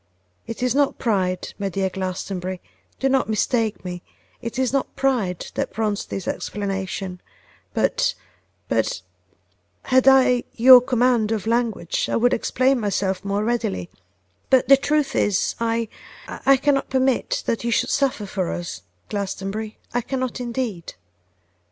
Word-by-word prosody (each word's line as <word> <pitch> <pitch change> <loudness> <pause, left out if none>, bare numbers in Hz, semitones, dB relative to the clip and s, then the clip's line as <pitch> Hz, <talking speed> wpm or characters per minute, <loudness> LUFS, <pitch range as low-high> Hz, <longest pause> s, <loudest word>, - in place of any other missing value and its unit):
It 230 +2 -5
is 250 -2 +2
not 285 0 +2
pride, 185 -5 -1
my 200 -1 -1
dear 190 +1 -1
Glastonbury; 185 0 -4 0.4
do 270 - +1
not 265 -3 +1
mistake 220 -1 0
me; 180 -1 -5 0.4
it 235 +1 -5
is 260 -1 0
not 275 - -1
pride 230 -10 0
that - - -2
prompts 215 -2 -1
this 195 - -6
explanation; 195 -2 -4 0.5
but - - +1 0.5
but - - 0 0.8
had 260 0 +3
I 255 -2 +5
your 250 +1 +9
command 245 -3 +2
of 220 -2 -1
language 225 -7 0
I - - 0
would 245 +2 +3
explain 260 +3 +1
myself 195 -3 -1
more 200 +1 -1
readily; 155 - -2 0.6
but 260 -1 +4
the 275 - +9
truth 295 +1 0
is, 205 -3 +1
I 230 0 0 0.4
I - - -7
I 275 0 +7
cannot 275 0 +1
permit 265 - +1
that 230 - -1
you 235 - -1
should 230 - +1
suffer 275 -6 +1
for 190 -3 -2
us, 175 -1 -5 0.3
Glastonbury, 200 +1 -4 0.2
I 245 - +1
cannot 255 0 -3
indeed. 235 -8 -4
230 Hz, 145 wpm, -22 LUFS, 195-255 Hz, 0.8 s, your